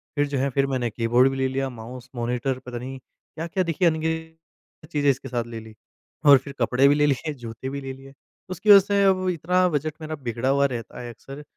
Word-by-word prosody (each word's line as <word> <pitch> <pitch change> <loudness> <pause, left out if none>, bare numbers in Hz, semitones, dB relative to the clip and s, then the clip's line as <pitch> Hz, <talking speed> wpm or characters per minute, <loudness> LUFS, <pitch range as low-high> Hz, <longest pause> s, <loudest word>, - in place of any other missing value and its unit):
फिर 145 0 +1
जो 140 -1 -2
है 135 +2 +1
फिर 140 0 +2
मैंने 125 -3 -1
कीबोर्ड 120 +4 +3
भी 135 - -4
ले 130 - +1
लिया 135 0 -2
माउस, 125 +2 -10
मॉनिटर 125 +2 -2
पता 120 -1 -6
नहीं 130 +2 -6
क्या-क्या 165 +7 -5
देखिए 170 +1 +1
अनगिनत 160 0 -5
चीज़ें 145 -1 +2
इसके 135 0 -1
साथ 120 -1 -1
ले 115 -1 -7
ली। 110 0 -13 0.5
और 140 -2 +9
फिर 140 +1 -8
कपड़े 130 +2 +3
भी 145 - +5
ले 145 0 +3
लिए, 145 +2 0
जूते 120 0 -7
भी 140 0 -5
ले 135 0 -6
लिए। 135 +1 -14 0.4
उसकी 185 +4 -3
वजह 200 -1 +11
से 200 +1 +1
अब 185 -1 +2
इतना 180 +2 +2
बजट 155 0 -2
मेरा 155 0 -4
बिगड़ा 120 +2 -1
हुआ 140 +1 +3
रहता 120 -4 -4
है 120 - -7
अक्सर। 135 +5 -10
135 Hz, 225 wpm, -24 LUFS, 125-155 Hz, 0.5 s, वजह